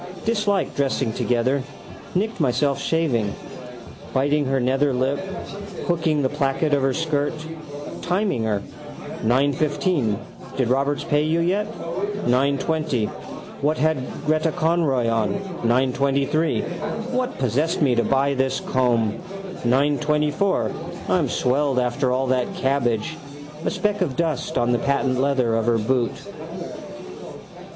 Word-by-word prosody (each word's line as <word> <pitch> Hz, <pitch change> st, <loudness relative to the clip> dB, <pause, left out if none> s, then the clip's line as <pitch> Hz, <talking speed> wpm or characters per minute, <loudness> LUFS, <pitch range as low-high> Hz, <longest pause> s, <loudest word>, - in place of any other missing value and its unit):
Dislike 210 Hz, -3 st, +1 dB
dressing 135 Hz, -4 st, 0 dB
together. 125 Hz, +4 st, +1 dB, 0.5 s
Nicked 215 Hz, +4 st, 0 dB
myself 140 Hz, 0 st, +1 dB
shaving. 125 Hz, -11 st, +1 dB, 0.8 s
Biting 145 Hz, +2 st, +2 dB
her 135 Hz, 0 st, +1 dB
nether 135 Hz, +2 st, +2 dB
lip, 130 Hz, +3 st, +1 dB, 0.7 s
hooking 160 Hz, -4 st, +1 dB
the -, -, +4 dB
placket 145 Hz, +1 st, 0 dB
of 140 Hz, -, +3 dB
her 135 Hz, 0 st, +2 dB
skirt. 155 Hz, -3 st, 0 dB, 0.7 s
Timing 180 Hz, -, 0 dB
her. 105 Hz, -2 st, 0 dB, 0.6 s
9.15. 140 Hz, -, +2 dB, 0.4 s
Did 130 Hz, -3 st, +1 dB
Roberts 140 Hz, +3 st, +1 dB
pay 145 Hz, 0 st, +2 dB
you 155 Hz, +2 st, +1 dB
yet? 200 Hz, +5 st, 0 dB
9.20. 155 Hz, -, 0 dB, 0.5 s
What 150 Hz, +2 st, +2 dB
had 155 Hz, 0 st, +2 dB, 0.3 s
Gretta 155 Hz, +1 st, +2 dB
Conroy 155 Hz, -7 st, +1 dB
on? 115 Hz, -, +1 dB, 0.3 s
9.23. 140 Hz, -, 0 dB
What 255 Hz, 0 st, -1 dB
possessed 145 Hz, -, +1 dB
me 130 Hz, -4 st, +4 dB
to 120 Hz, 0 st, +2 dB
buy 135 Hz, +1 st, +2 dB
this 130 Hz, 0 st, 0 dB
comb? 120 Hz, -4 st, +1 dB, 0.4 s
9.24. 150 Hz, +7 st, +1 dB
I'm -, -, +2 dB
swelled 135 Hz, +1 st, +1 dB
after 125 Hz, +2 st, +1 dB, 0.2 s
that 130 Hz, -1 st, +1 dB
cabbage. 120 Hz, -5 st, 0 dB, 0.5 s
A -, -, +1 dB
speck 205 Hz, -1 st, -1 dB
of 150 Hz, -8 st, 0 dB
dust 160 Hz, -5 st, -1 dB
on 120 Hz, 0 st, +2 dB
the 120 Hz, -, +2 dB
patent 140 Hz, -2 st, +1 dB
leather 130 Hz, -4 st, +2 dB
of 115 Hz, 0 st, 0 dB
her 120 Hz, -1 st, +4 dB
boot. 120 Hz, +2 st, 0 dB
140 Hz, 120 wpm, -23 LUFS, 125-155 Hz, 0.8 s, the